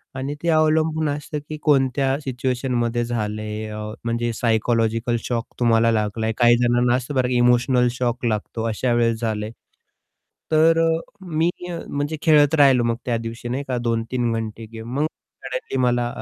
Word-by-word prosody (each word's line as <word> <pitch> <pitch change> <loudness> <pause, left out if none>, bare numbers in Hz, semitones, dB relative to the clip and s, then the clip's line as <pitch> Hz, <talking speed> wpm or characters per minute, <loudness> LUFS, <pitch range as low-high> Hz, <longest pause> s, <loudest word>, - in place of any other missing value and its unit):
आणि 135 +2 -3
ते 170 - +1
अवलंबून 155 0 +2
असतं 150 +1 -4
की 155 - -5
कोणत्या 135 -2 +2
सिच्युएशनमध्ये 125 -2 -1
झालंय 110 -2 -3
अ, 105 - -6 0.3
म्हणजे 115 0 -1
सायकॉलॉजिकल 115 0 +1
शॉक 120 -1 -2
तुम्हाला 115 -1 +3
लागलाय. 110 0 -1
काही 120 -1 +5
जणांना 120 0 +2
असतं 130 +3 -4
बरं 130 -1 +2
इमोशनल 125 0 +3
शॉक 125 0 -2
लागतो 110 0 -2
अशा 120 +3 0
वेळेस 115 -1 +1
झालंय. 110 -1 -2 1.0
तर 160 +1 +4
अ, 165 - +3 0.3
मी 165 -2 0 0.2
अ, 170 - -4
म्हणजे 145 +2 -3
खेळत 150 -1 +5
राहिलो 135 -5 +5
मग 115 0 +1
त्या 120 -2 0
दिवशी 115 +1 -6
नाही 135 +3 -2
का 125 -2 -1
2-3 115 +1 -1
घंटे 115 0 -4
गेम 115 +2 -7
मग 150 - +2 0.4
सडनली - - -4
मला 120 -1 +2
120 Hz, 155 wpm, -22 LUFS, 115-135 Hz, 1.0 s, काही